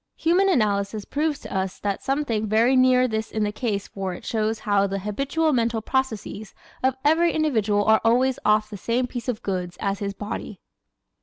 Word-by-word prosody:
Human 360 +4 +2
Analysis 210 - 0
proves 300 0 -1
to - - -7
us 190 0 -2
that 200 -1 -3
something 265 -6 -1
very 230 +5 +3
near 255 0 +5
this 220 -2 -3
is 215 - -1
the 210 - 0
case 210 -3 -2
for 190 -2 -4
it - - -12
shows 220 0 -1
how 200 -1 +2
the 195 0 -3
habitual 275 - 0
mental 230 -2 +1
processes 220 -4 -3 0.3
of 260 0 +2
every 330 +3 +4
individual 220 -10 +1
are 220 0 +4
always 250 +3 +2
"off 215 0 +2
the 205 - -6
same 235 +6 0
piece 245 -1 -6
of 230 -3 -3
goods" 180 -2 -3
as 200 -2 -1
his 200 -1 -3
body. 205 -1 -6
220 Hz, 185 wpm, -24 LUFS, 205-260 Hz, 0.3 s, near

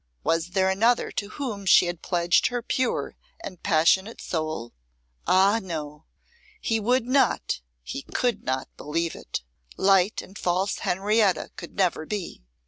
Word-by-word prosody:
Was 165 +1 +1
there 190 +1 +1
another 225 +6 +2
to 205 - -4
whom 215 -6 -5
she 180 - +7
had 175 -1 -4
pledged 175 0 +2
her 245 -1 -3
pure 255 +2 -1 0.3
and 185 - -8
passionate 190 +5 +2
soul? 155 -8 -3 0.5
Ah, 195 +4 +4
no! 155 -5 -6 0.5
he 225 - 0
would 245 +3 +2
not, 255 - +1 0.2
he - - -5
could 245 - -1
not 130 0 -2
believe 165 +2 -2
it. - - -6 0.3
Light 195 +1 +3
and 195 - -12
false 185 +3 0
Henrietta 200 +1 +1
could - - -9
never 175 -5 0
be. 200 - -5
190 Hz, 140 wpm, -25 LUFS, 170-215 Hz, 0.5 s, she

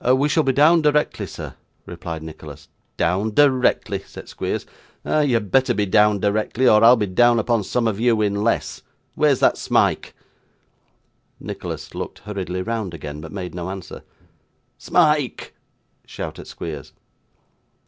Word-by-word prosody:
'We 130 +4 +3
shall 160 - +3
be 135 - +1
down 155 +5 +5
directly, 150 0 +1
sir,' - - -8 0.3
replied 80 -2 -7
Nicholas. 75 -2 -11 0.3
'Down 95 +6 0
directly!' 130 -8 +2
said - - -12
Squeers. - - -4 0.4
'Ah! 155 - +1
you 145 -5 +2
had 105 -4 -2
better 130 -1 +3
be 105 0 +1
down 105 +2 +3
directly, 110 +5 0
or 110 -2 +5
I'll 120 +2 +8
be 110 -4 -1
down 120 +5 +3
upon 115 -1 +1
some 115 +4 -1
of 105 -2 -2
you 115 -1 +2
in 100 0 -1
less. 115 - -1 0.3
Where's - - +2
that - - +3
Smike?' - - 0 1.2
Nicholas - - -7
looked - - -6
hurriedly 95 -3 -4
round 110 -5 -3
again, 75 -1 -7
but 80 - -9
made 90 -3 -6
no 90 0 -5
answer. 95 -2 -8 0.8
'Smike!' 150 -6 +1 0.5
shouted - - -7
Squeers. 75 -4 -8
105 Hz, 150 wpm, -21 LUFS, 95-125 Hz, 1.2 s, I'll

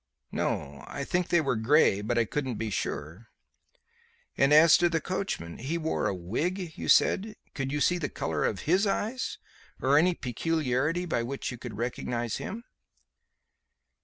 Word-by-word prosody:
"No. 70 -1 -3
I - - -5
think 180 -1 0
they 175 - +3
were 135 -5 0
grey, 110 -3 +4
but 120 +3 -1
I 115 - +3
couldn't 130 0 -3
be 110 0 -3
sure." 85 +6 -4 1.1
"And 135 +1 +3
as 155 +2 +8
to 175 0 +3
the 165 -1 +1
coachman. 185 - -4
He 140 +8 -2
wore 160 -1 -1
a 95 - -1
wig, 160 - -3
you - - -5
said. 210 +2 +3 0.2
Could 135 -1 -3
you 150 - -1
see 175 +4 +2
the 145 - -2
colour 80 -2 -2
of 95 - -1
his 185 +6 +2
eyes? 225 +5 -2 0.4
Or 140 +3 +4
any 175 +2 +3
peculiarity 150 +4 -1
by 160 -8 0
which 135 +4 -4
you 120 - -8
could 120 -5 -7
recognize 120 0 -2
him?" 230 +4 -6
140 Hz, 165 wpm, -28 LUFS, 115-170 Hz, 1.1 s, as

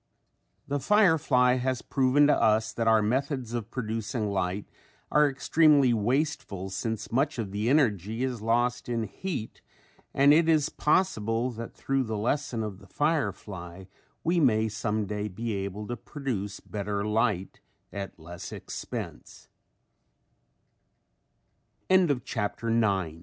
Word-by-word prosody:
The 140 +1 -1
firefly 145 - +4
has 130 0 -1
proven 135 +2 +3
to 150 - +5
us 110 0 +2
that 115 -1 -1
our 110 -1 +5
methods 125 +1 -1
of 115 -2 -3
producing 110 -2 -3
light 95 +1 -1 0.5
are 150 -1 +5
extremely 140 -1 +4
wasteful 115 - -1
since 110 +1 -3
much 135 +4 +1
of 110 -5 -3
the 105 +3 -1
energy 115 - +1
is 125 -4 -2
lost 120 +1 0
in 115 -2 0
heat 125 - -5 0.5
and 140 +1 +5
it 165 +1 +4
is 155 -2 +3
possible 125 - +1
that 115 0 -8
through 135 -1 -1
the 110 -1 -3
lesson 115 +1 -1
of 100 -3 -6
the - - -16
firefly 100 - -2 0.4
we 170 +2 +2
may 110 -7 +3
some 105 0 -2
day 105 +1 -3
be 110 +3 -4
able 100 +1 -4
to 120 - -4
produce 110 -6 -5
be 100 0 -3
115 Hz, 115 wpm, -28 LUFS, 105-140 Hz, 0.5 s, to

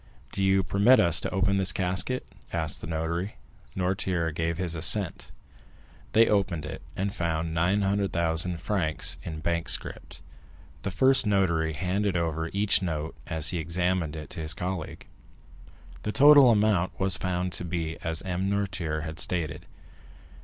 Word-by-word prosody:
"Do 100 - -2
you 95 0 +3
permit 100 +7 +4
us 85 -1 +4
to - - -2
open 95 +1 +1
this 95 -1 +2
casket?" 95 +7 -1 0.3
asked 80 -3 -2
the - - -7
notary. 85 +4 -3 0.4
Noirtier 90 -2 -1
gave 80 +1 -2
his 90 -2 -2
assent. 85 +3 0 0.8
They 115 +1 +6
opened 95 -7 0
it, 80 - -7
and 100 +1 -2
found 80 -2 -2
900,000 90 -2 +1
francs 85 -4 0
in 80 -1 -6
bank 85 +1 -1
scrip. - - -4 0.7
The - - -3
first 130 +5 +3
notary 85 -6 +1
handed 95 +4 -1
over 80 -1 -1
each 100 0 +2
note, 80 -4 -3
as 80 -3 0
he 90 - -2
examined 85 -1 -1
it, 75 -2 -8
to - - -7
his 80 -1 0
colleague. 90 -3 -5 1.0
The 105 - -2
total 145 0 +8
amount 105 -5 +2
was 95 -1 +4
found 90 -1 -2
to 85 - -2
be 80 -2 -3
as 80 +1 -4
M. 95 +1 -2
Noirtier 90 -6 -2
had 80 0 -6
stated. 80 -5 -3
90 Hz, 150 wpm, -27 LUFS, 80-95 Hz, 1.0 s, total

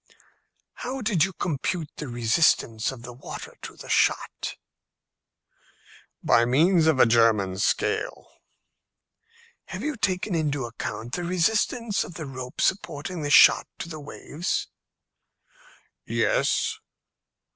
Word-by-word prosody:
"How 260 +1 -4
did 210 -9 +2
you 190 - 0
compute 165 -1 -3
the 150 - -5
resistance 120 -1 +2
of 125 -3 -11
the 125 0 -8
water 125 - -9
to - - -9
the - - -11
shot?" - - 0 1.7
"By 115 +1 +4
means 160 +7 +3
of 155 -5 +3
a - - +8
German 110 -5 +3
scale." 100 - -1 1.4
"Have - - -7
you 305 -1 -2
taken 200 -2 -1
into 145 -5 -1
account 115 +1 -6
the 175 - -2
resistance 210 +5 +1
of 170 - -10
the 155 - -6
rope 130 -2 -6
supporting 175 -2 -1
the 145 - -2
shot - - +7
to 170 - -6
the 155 -2 -7
waves?" 150 +3 -4 1.3
"Yes." - - 0
155 Hz, 120 wpm, -25 LUFS, 120-185 Hz, 1.7 s, a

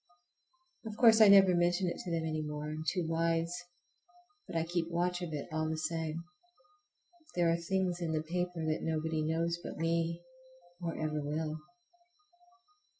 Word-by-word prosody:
Of 215 -1 -7
course 225 -2 +7
I 215 - +10
never 195 -2 +8
mention 175 +1 +2
it 170 - -3
to - - -6
them 165 -1 -1
any 155 -1 -2
more,—I 150 0 -4
am 155 +1 -5
too 180 -1 -1
wise,—but 175 - -4
I 165 - +2
keep 170 0 -2
watch 175 +1 0
of 175 -2 -4
it 150 -2 -4
all 155 0 0
the 160 - -2
same. 160 +1 -3 1.1
There 170 -1 +3
are - - +3
things 185 -2 0
in 165 -2 -1
that 155 0 -1
paper 175 0 -2
that 155 0 -1
nobody 160 0 -1
knows 165 +2 0
but - - -6
me, 165 +1 0 0.6
or 170 -1 -3
ever 155 -1 -2
will. 155 +2 -3
165 Hz, 160 wpm, -32 LUFS, 160-175 Hz, 1.1 s, I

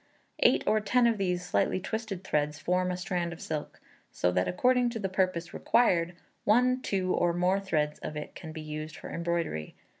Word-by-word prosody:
Eight - - +4
or 215 - +3
ten 245 +3 +3
of 230 -3 +2
these 180 -2 0
slightly 185 - +1
twisted 200 -1 -4
threads 150 -4 0
form 180 +4 0
a 180 - -2
strand 180 -2 -2
of 170 - -11
silk, 155 -2 -5 0.3
so 90 - +1
that, 90 +1 +1
according 250 - +3
to 235 - -4
the 195 -3 -2
purpose 185 -2 0
required, 175 -7 +2 0.3
one, 250 +4 +3
two, 185 -5 0
or 175 -1 +2
more 180 +2 +2
threads 150 -6 -1
of 150 - -5
it 150 - -6
can 160 - -8
be 155 0 -7
used 155 0 -6
for - - -8
embroidery. 170 - -2
180 Hz, 190 wpm, -29 LUFS, 155-200 Hz, 0.3 s, Eight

